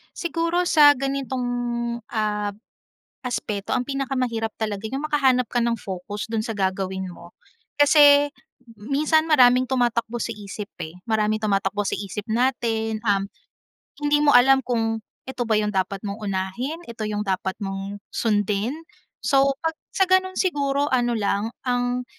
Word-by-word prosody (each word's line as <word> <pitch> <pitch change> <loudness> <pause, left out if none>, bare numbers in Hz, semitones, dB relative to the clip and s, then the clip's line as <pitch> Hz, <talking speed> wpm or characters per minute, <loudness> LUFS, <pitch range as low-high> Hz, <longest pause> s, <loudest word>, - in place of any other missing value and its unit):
Siguro 335 +1 0
sa 295 -2 +7
ganitong, 270 -1 -3 0.7
ah, 210 -2 -1 0.7
aspeto, 210 -4 -3
ang 250 -1 0
pinakamahirap 255 -5 -2
talaga 210 -1 -2
yung 275 +4 -3
makahanap 260 -5 +3
ka 245 - 0
ng 235 0 0
focus 200 +3 -6
do’n 225 -1 -1
sa 225 - -3
gagawin 190 -1 -2
mo. 175 - -13 0.4
Kasi 290 0 +6
m - - -33 0.6
minsan 310 +2 +3
maraming 255 -3 +6
tumatakbo 240 -2 0
sa - - -2
isip 205 0 -8 0.2
eh. 160 - -10 0.2
Maraming 215 0 +1
tumatakbo 200 -1 0
sa - - 0
isip 205 +1 -5
natin, 225 -2 0
um, 200 -2 +2 0.8
hindi 295 0 +3
mo 290 - +5
alam 265 +2 +6
kung 225 -2 -1 0.2
ito 260 -2 -3
ba 220 - +2
yung 210 0 -1
dapat 190 +1 -1
mong 200 +1 -4
unahin, 205 - -3
ito 230 -1 -6
yung 210 0 -2
dapat 190 0 -1
mong 195 +1 -5
sundin? 210 +1 0 0.5
So, 275 -1 +3
‘pag 325 - +1 0.2
sa 385 - +4
gano’n 375 0 +3
siguro, 285 -5 +1
ano 240 -1 +2
lang 205 +1 0 0.2
ang 245 0 0
235 Hz, 145 wpm, -23 LUFS, 205-275 Hz, 0.8 s, sa